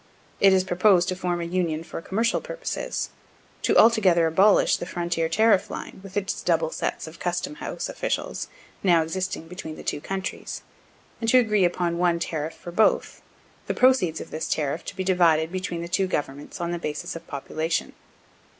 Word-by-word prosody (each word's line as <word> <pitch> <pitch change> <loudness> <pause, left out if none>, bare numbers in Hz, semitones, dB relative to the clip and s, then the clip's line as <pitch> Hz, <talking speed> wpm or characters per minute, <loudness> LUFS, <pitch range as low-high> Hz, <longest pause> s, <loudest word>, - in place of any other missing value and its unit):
It 195 - +6
is 190 -1 +4
proposed 180 0 +3
to 185 - -1
form 180 -1 -2
a - - -2
union 170 -2 -1
for 165 0 -7
commercial 225 +7 0
purposes - - -4 0.5
to - - +2
altogether 195 -7 +5
abolish 190 +6 +4
the 175 - -6
frontier 170 -2 -1
tariff 220 -1 +3
line, - - -7
with 195 +1 -8
its 195 -1 -2
double 165 -2 +1
sets - - -3
of 160 +1 -11
custom 175 +11 -2
house - - -4
officials - - -3 0.3
now 170 -4 +4
existing 185 0 -3
between 165 -3 -7
the - - -10
two 145 - -2
countries, 190 +3 -5 0.6
and 225 - 0
to 255 - +6
agree 210 -6 +4
upon 175 -1 0
one 175 -1 +3
tariff 160 -2 -3
for 175 - -9
both, 215 +5 +2 0.5
the - - -1
proceeds 250 -11 +3
of - - -9
this 155 - -4
tariff 150 +1 -1
to - - -6
be 190 - -2
divided 170 -4 +3
between 180 -2 -3
the - - -5
two 190 +2 +1
governments 145 -4 -4
on 170 0 -2
the 175 - -2
basis 150 -1 -4
of 165 0 -9
population. 155 +3 -2
175 Hz, 180 wpm, -25 LUFS, 165-190 Hz, 0.6 s, It